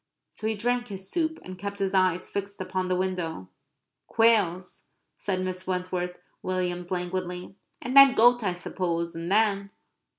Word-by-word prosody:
So 215 - -5
he 220 - 0
drank 245 +3 0
his 190 -2 -7
soup; 320 -2 0
and 185 0 -9
kept 200 0 -5
his 195 -1 -1
eyes 185 -2 +2
fixed 200 0 -5
upon 185 0 -2
the 185 - +1
window. 180 - -3 0.6
"Quails," 200 -6 +2 0.3
said 185 -2 -1
Mrs. 185 0 -4
Wentworth 180 -1 -2 0.2
Williams 180 -1 -2
languidly. 180 0 -3 0.3
"And 255 - -3
then 275 -1 +9
goat, 245 +2 +5
I 190 -4 0
suppose; 170 -1 -3
and 165 +2 -5
then..." 200 -2 +2
185 Hz, 155 wpm, -27 LUFS, 180-205 Hz, 0.6 s, then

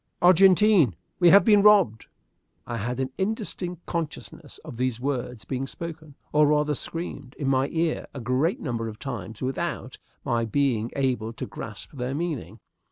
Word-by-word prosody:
"Argentine, 185 - +5 0.2
we 175 -2 +6
have 200 +3 +7
been 210 -3 +6
robbed!" 200 - +4 0.6
I 120 - -4
had 120 +4 -3
an 130 0 -2
indistinct 190 -4 -3
consciousness 160 -2 -5
of 145 -7 -8
these 125 -2 -1
words 125 -3 -3
being 135 0 -3
spoken, 160 -2 -8 0.2
or 150 0 +5
rather 150 0 +2
screamed, 145 -3 -6
in 140 - -3
my 135 0 +2
ear 165 +1 -1
a 140 - -7
great 130 +9 0
number 115 -4 -3
of 110 -1 -7
times 120 -3 -6
without 130 +1 -3 0.3
my 115 -1 +1
being 115 -1 0
able 125 -5 -1
to - - -5
grasp - - -8
their 130 0 -3
meaning. 140 - -4
140 Hz, 160 wpm, -25 LUFS, 125-170 Hz, 0.6 s, have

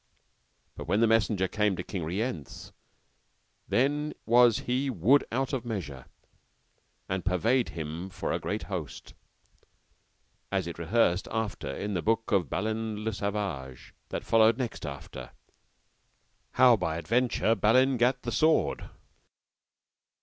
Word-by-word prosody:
But - - -9
when 105 - +2
the 115 - +5
messenger 105 -4 +2
came 105 0 0
to 90 - -5
King 90 -3 -5
Rience, 90 - -4 1.0
then 145 +4 0
was 120 -1 +5
he 130 +3 -1
wood 125 - +3
out 135 +4 -1
of 130 -3 -1
measure, 85 - -6 1.0
and 95 -2 -2
purveyed 110 +8 +1
him 80 +4 -5
for - - -4
a - - -1
great - - -3
host, - - -6 1.4
as - - 0
it 85 0 -7
rehearseth 90 +1 +1
after 110 -10 -3
in 100 +8 -4
the 90 - -1
book 115 +3 0
of 95 -8 +2
Balin 110 +1 -2
le 110 0 -2
Savage, 100 -11 -4 0.2
that - - -4
followeth 115 0 +4
next 120 - -4
after, 70 -1 -8 1.2
how 125 -2 +6
by 80 -6 -2
adventure 115 +4 +1
Balin 130 +4 +3
gat 125 +2 +1
the 120 - -3
sword. 160 +4 +1
110 Hz, 130 wpm, -28 LUFS, 90-120 Hz, 1.4 s, how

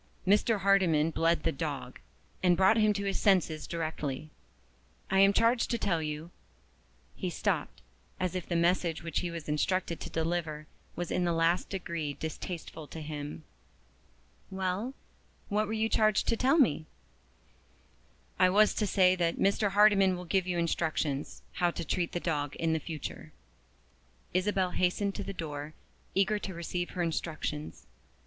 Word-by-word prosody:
Mr. 205 +2 +3
Hardyman 175 -6 +3
bled 165 -1 +1
the - - +2
dog, 135 - -5 0.4
and 180 -2 +4
brought 190 +3 +5
him 215 -1 +4
to 200 -1 -2
his 195 - -1
senses 180 -6 +2
directly. 155 -3 -4 0.8
I 190 - +4
am 195 0 +7
charged 230 +3 +2
to 235 - +1
tell 170 -7 0
you 155 +2 -5 0.4
" - - -35
He - - +1
stopped, - - -2 0.4
as 185 -1 -1
if 185 -1 -4
the 175 - 0
message 170 -1 +1
which 165 - -1
he 175 - -2
was 170 -2 -7
instructed 170 +3 0
to - - -6
deliver 160 -2 -2 0.3
was 175 -1 -4
in 180 - +1
the 175 - +1
last 165 +2 +2
degree 170 -6 -3
distasteful 160 0 -6
to 160 - -8
him. 150 0 -6 1.1
"Well, 190 +7 -2 0.5
what 210 +1 +1
were 220 - -3
you 220 0 +1
charged 215 -2 +2
to 230 - +3
tell 260 +6 +3
me?" 160 - +3 1.5
"I 185 - +6
was 210 +3 +5
to 210 - 0
say 185 -1 +4
that 170 -2 0
Mr. 200 +1 +2
Hardyman 195 -2 +5
will 180 - -7
give 185 +2 +1
you 180 -1 -1
instructions 155 -4 -1
how 175 -1 +1
to 170 -1 -5
treat 170 +2 -1
the 175 - -1
dog 145 -5 -2
for - - -1
the 160 0 +1
future." 155 -1 -7 1.0
Isabel 185 0 +1
hastened 185 +3 0
to 205 - -5
the 195 - -5
door, 150 -4 -6 0.4
eager 200 +2 +2
to 190 -3 -6
receive 175 +1 -3
her 180 - -2
instructions. 155 -2 -4
175 Hz, 160 wpm, -30 LUFS, 160-195 Hz, 1.5 s, am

